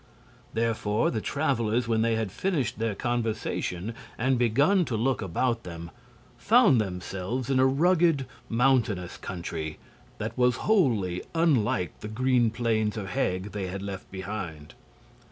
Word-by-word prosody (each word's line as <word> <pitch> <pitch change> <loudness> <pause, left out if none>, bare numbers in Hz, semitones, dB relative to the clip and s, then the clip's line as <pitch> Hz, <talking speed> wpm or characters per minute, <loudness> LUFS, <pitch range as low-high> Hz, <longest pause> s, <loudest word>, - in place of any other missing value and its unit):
Therefore 110 -2 +1
the 110 - -2
travelers, 120 -5 0
when 110 -1 +2
they 115 0 +2
had 110 -4 -2
finished 135 - -1
their 110 -2 -1
conversation 110 -4 -2 0.2
and 130 +1 +1
begun 140 - +3
to 115 -6 -2
look 130 +4 +1
about 115 +6 0
them, 85 -3 -8 0.5
found 120 - +5
themselves 95 +6 -3
in 130 - +3
a 130 - +6
rugged, 160 0 +3 0.2
mountainous 115 -7 +1
country 85 -3 -5 0.4
that 110 +2 -4
was 125 -1 +3
wholly 115 - +2
unlike 120 - +1
the - - -6
green 125 +1 +2
plains 110 -1 0
of 100 -2 -4
Heg 95 0 -1
they 100 -3 -3
had 95 +2 -5
left 100 -1 -6
behind. 95 -6 -6
115 Hz, 135 wpm, -27 LUFS, 95-130 Hz, 0.5 s, a